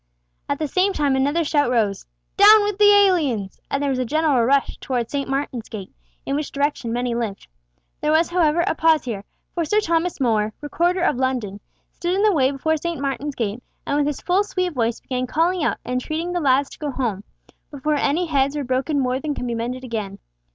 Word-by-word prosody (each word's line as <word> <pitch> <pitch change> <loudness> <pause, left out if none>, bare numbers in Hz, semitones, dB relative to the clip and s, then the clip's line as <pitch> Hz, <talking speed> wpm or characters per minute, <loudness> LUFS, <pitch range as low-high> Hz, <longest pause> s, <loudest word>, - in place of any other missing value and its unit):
At 285 - 0
the 310 - -2
same 380 +6 +1
time 285 -5 +1
another 285 +5 +1
shout 290 -3 +1
rose, 215 -5 0 0.3
"Down 420 +1 +8
with 410 -1 -2
the 410 0 +7
aliens!" 320 - +2
and 275 +1 -1
there 280 - +1
was 255 - -1
a - - +1
general 295 -1 +2
rush 275 +3 +2
towards 245 -3 -3
St. 280 -1 -2
Martin's 270 -4 -3
gate, 200 -4 -8 0.3
in 275 - -1
which 300 0 -3
direction 280 -4 -1
many 245 0 -1
lived. 230 -4 -4 0.5
There 300 - 0
was, 325 +2 +3
however, 340 -2 +2
a - - +1
pause 320 -1 +3
here, 215 -5 -4 0.3
for 340 - -1
Sir 420 +7 +2
Thomas 335 -3 0
More, 220 -4 +1
Recorder 345 +5 0
of 355 - +2
London, 250 -6 -2 0.3
stood 350 +1 -2
in 400 - +1
the 425 -2 +4
way 265 -5 +3
before 315 +3 0
St. 340 0 -4
Martin's 275 +1 -3
gate, 225 0 -3 0.2
and 285 - -1
with 290 0 +2
his 295 - -3
full 370 +3 +2
sweet 365 -3 -2
voice 235 -3 -1
began 255 -1 -3
calling 335 +4 +1
out - - 0
and 250 +1 -1
entreating 325 +5 -3
the 355 - 0
lads 275 -2 +2
to - - -13
go 300 - -3
home, 235 -7 -2 0.5
before 295 +1 -2
any 300 +4 +1
heads 280 -2 +1
were 290 - -2
broken 265 +3 0
more 255 -1 0
than 295 +1 -3
could - - -4
be 240 - -2
mended 245 +3 -4
again. 215 -5 -4
280 Hz, 215 wpm, -22 LUFS, 250-325 Hz, 0.5 s, Down